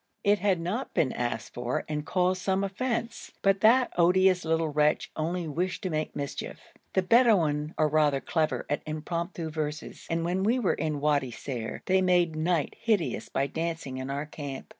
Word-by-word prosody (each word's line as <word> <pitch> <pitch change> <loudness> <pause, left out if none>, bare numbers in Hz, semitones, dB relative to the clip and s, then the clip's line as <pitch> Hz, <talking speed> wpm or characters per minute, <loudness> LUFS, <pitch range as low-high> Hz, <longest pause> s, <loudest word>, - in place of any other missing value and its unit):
It 205 0 +3
had 195 -4 +2
not 190 +10 -3
been 135 - +2
asked 120 -2 -3
for 120 0 -2
and 150 -1 -3
caused 185 +2 +1
some 190 +1 +1
offence, 230 +4 -3
but 195 0 +3
that 245 +3 +5
odious 180 +1 +4
little 160 0 +1
wretch 150 0 +1
only 170 +2 -2
wished 175 +5 -2
to 185 - -2
make 155 0 -2
mischief. 140 -1 -5 0.3
The 190 - +2
Bedouin 180 -10 +3
are 155 - +3
rather 150 -2 +3
clever 155 +2 -1
at 145 - -1
impromptu 165 +2 -4
verses, 155 0 -5
and 165 0 0
when 180 +2 0
we 225 +6 +2
were 230 -7 +1
in 155 -2 -2
Wadi 145 -3 +2
Ser 120 -1 -5
they 190 0 +3
made 175 -3 +3
night 160 -1 0
hideous 220 -6 0
by 135 - 0
dancing 160 -3 -4
in 130 +1 -5
our 140 +2 -2
camp. 145 -3 -7
165 Hz, 180 wpm, -28 LUFS, 150-190 Hz, 0.3 s, that